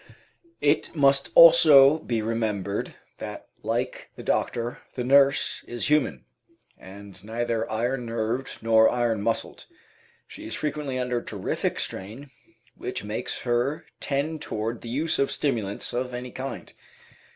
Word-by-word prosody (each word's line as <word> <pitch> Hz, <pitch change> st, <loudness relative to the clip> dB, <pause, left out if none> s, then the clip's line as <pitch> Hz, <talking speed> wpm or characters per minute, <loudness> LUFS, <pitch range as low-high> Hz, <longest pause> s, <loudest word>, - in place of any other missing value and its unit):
It 150 Hz, +3 st, +1 dB
must 140 Hz, -2 st, +4 dB
also 155 Hz, -3 st, +8 dB
be 115 Hz, -7 st, -2 dB
remembered 105 Hz, -3 st, -2 dB, 0.2 s
that, -, -, -8 dB
like -, -, -3 dB
the -, -, -9 dB
doctor, 120 Hz, 0 st, -1 dB, 0.2 s
the 125 Hz, -, -2 dB
nurse 140 Hz, +2 st, +3 dB
is 120 Hz, +4 st, -3 dB
human, 80 Hz, -, +1 dB, 0.5 s
and 95 Hz, 0 st, -12 dB
neither 115 Hz, +1 st, -2 dB
iron 120 Hz, +2 st, -1 dB
nerved 115 Hz, +3 st, -3 dB
nor 110 Hz, 0 st, +5 dB
iron 120 Hz, -4 st, 0 dB
muscled. 115 Hz, +2 st, -2 dB, 0.6 s
She -, -, -10 dB
is -, -, -4 dB
frequently 150 Hz, -3 st, -3 dB
under 125 Hz, -1 st, -1 dB
terrific 100 Hz, -5 st, -3 dB
strain, 115 Hz, +9 st, -5 dB, 0.4 s
which 125 Hz, -, -5 dB
makes 105 Hz, +4 st, -4 dB
her 125 Hz, +5 st, -1 dB
tend 150 Hz, +3 st, -2 dB
toward 110 Hz, +2 st, -4 dB
the 115 Hz, -, -8 dB
use 155 Hz, +6 st, -1 dB
of 140 Hz, -, +1 dB
stimulants 110 Hz, -8 st, -2 dB
of 125 Hz, 0 st, -2 dB
any 125 Hz, 0 st, -6 dB
kind. 135 Hz, +3 st, -7 dB
120 Hz, 130 wpm, -25 LUFS, 110-140 Hz, 0.6 s, also